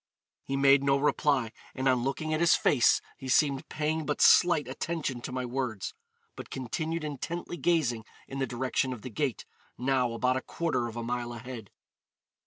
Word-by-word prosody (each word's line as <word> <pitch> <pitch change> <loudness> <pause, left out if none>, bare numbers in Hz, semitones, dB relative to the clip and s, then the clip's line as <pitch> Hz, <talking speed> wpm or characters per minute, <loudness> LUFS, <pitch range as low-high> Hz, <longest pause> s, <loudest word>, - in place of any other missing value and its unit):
He 135 - -3
made 140 0 +5
no 140 0 +3
reply, 140 -4 +1 0.2
and 130 0 -1
on 130 -2 +3
looking 155 +4 -2
at 155 - 0
his 170 0 +5
face 125 -5 +4 0.2
he 130 - -7
seemed 140 0 +2
paying 155 +1 -1
but 150 0 -2
slight 165 -6 +5
attention 135 -2 -3
to - - -6
my 130 0 -2
words, 120 -4 -3 0.4
but - - -9
continued 155 +6 -3
intently 155 +4 -4
gazing 135 -8 +1 0.2
in 135 - -6
the 135 - 0
direction 130 +2 -1
of 115 - -10
the 130 - -6
gate, 130 +1 -2 0.3
now 125 -2 +1
about 125 +2 +1
a - - -2
quarter 160 -8 -1
of 115 - -8
a 120 - -4
mile 120 0 -3
ahead. 120 -3 -8
135 Hz, 180 wpm, -29 LUFS, 125-150 Hz, 0.4 s, made